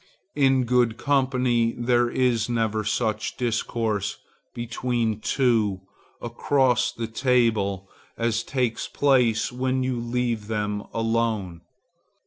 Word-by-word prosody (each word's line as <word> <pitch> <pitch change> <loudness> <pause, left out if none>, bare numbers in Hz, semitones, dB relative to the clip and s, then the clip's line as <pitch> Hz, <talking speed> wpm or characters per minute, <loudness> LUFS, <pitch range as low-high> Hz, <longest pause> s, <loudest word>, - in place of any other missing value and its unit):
In 135 -2 +3
good 120 -2 +2
company 125 -4 +1
there 120 0 +2
is 120 -3 +1
never 110 -2 0
such 110 0 -1
discourse 115 -4 -1 0.3
between 120 -2 -2
two, 110 -6 +1 0.4
across 125 +1 +1
the 115 - -5
table, 110 -5 +1 0.3
as 115 -1 0
takes 125 -3 -2
place 125 -6 +2
when 130 +1 -1
you 130 -2 -1
leave 120 -2 -2
them 105 -1 -2
alone. 115 -6 -1
115 Hz, 105 wpm, -24 LUFS, 110-125 Hz, 0.4 s, In